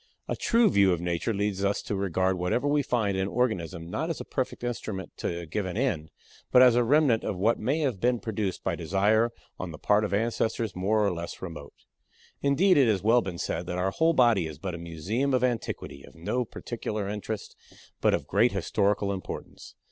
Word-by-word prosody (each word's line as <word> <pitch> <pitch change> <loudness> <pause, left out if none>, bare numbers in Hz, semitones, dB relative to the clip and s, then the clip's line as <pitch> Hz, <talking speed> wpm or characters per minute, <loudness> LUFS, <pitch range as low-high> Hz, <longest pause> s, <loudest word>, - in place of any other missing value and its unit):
A - - -1
true 230 -1 +3
view 100 -2 +4
of 85 - -2
Nature 85 +5 -1
leads 100 -2 -1
us 100 +1 +1
to 105 - -3
regard 95 -1 +1
whatever 90 +10 0
we 145 0 +3
find 110 -7 0
in 95 - 0
an 95 - 0
organism 95 -8 -1
not 160 - -3
as 165 - -3
a - - -6
perfect 130 -2 -3
instrument 110 -5 -4
to 85 0 -3
a - - -7
given 95 +3 -3
end, 95 - -1 0.4
but 125 - +8
as 125 -2 +7
a 120 +1 +3
remnant 135 -2 +3
of 95 - -2
what 110 +5 +2
may 140 +8 0
have 130 -9 -1
been 120 +2 +2
produced 105 -4 -3
by - - 0
desire 100 +7 +2 0.3
on 90 - -4
the 80 - -8
part 105 +5 +2
of 105 - -2
ancestors 110 0 -1
more 105 +3 +2
or 100 - +1
less 85 0 -6
remote. 80 -6 -9 0.6
Indeed, 155 +7 +4
it 135 - +5
has 100 -4 +1
well 115 +3 +5
been 95 -5 -5
said 85 0 -3
that 90 - -3
our 95 +2 0
whole 165 +8 +2
body 120 - +4
is 75 -2 -8
but 90 +3 -5
a 85 - -6
museum 95 - -1
of 125 - +1
antiquity 120 - -2
of - - -15
no 120 +10 -2
practical 115 -1 -5
interest, 105 +1 -4 0.5
but - - +4
of - - -5
great - - +3
historical 100 0 0
importance. 95 - -8
105 Hz, 210 wpm, -27 LUFS, 90-120 Hz, 0.6 s, but